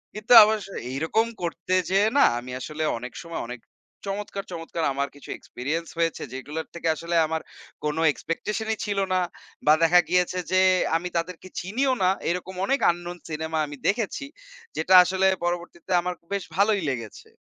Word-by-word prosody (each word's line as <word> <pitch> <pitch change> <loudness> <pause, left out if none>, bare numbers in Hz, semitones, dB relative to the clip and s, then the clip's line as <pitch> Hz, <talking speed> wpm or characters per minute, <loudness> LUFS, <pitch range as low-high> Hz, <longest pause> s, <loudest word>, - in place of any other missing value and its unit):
কিন্তু 215 +3 +2
আবার 215 +1 +2
স - - -11 0.2
এইরকম 160 +11 +1 0.2
করতে 170 +2 -3 0.2
যেয়ে 200 +3 +4
না - - +7 0.2
আমি 125 +1 -9
আসলে 155 +2 -4
অনেক 125 +2 -7
সময় 170 0 -5
অনেক 125 0 -7 0.5
চমৎকার, 200 0 -4
চমৎকার 165 -1 -4
আমার 140 +1 -1
কিছু 145 - -14
এক্সপেরিয়েন্স 155 +7 -4
হয়েছে 165 -1 0
যেগুলোর 145 +5 -5
থেকে 170 -1 -3
আসলে 170 +2 -3
আমার 160 0 -2 0.4
কোন 150 - 0 0.2
এক্সপেকটেশন 210 +9 -4
ই - - -24
ছিল 200 -1 -1
না। 185 - +3 0.5
বা 150 - +8
দেখা 175 +2 +6
গিয়েছে 180 0 +2
যে 185 - +4 0.4
আমি 180 +2 -5
তাদেরকে 180 +2 -4
চিনিও 255 +9 0
না। 185 - +5 0.2
এরকম 180 +1 -3
অনেক 275 +6 +1
আননোন 175 +1 -7
সিনেমা 160 +1 -3
আমি 145 -1 -8
দেখেছি। 220 +6 -1 0.5
যেটা 180 +4 +2
আসলে 190 +1 +1 0.2
পরবর্তীতে 175 0 -4
আমার 180 +1 -2 0.2
বেশ 200 -3 -1
ভালোই 205 -1 +3
লেগেছে। 115 -5 -6
175 Hz, 165 wpm, -25 LUFS, 160-195 Hz, 0.5 s, বা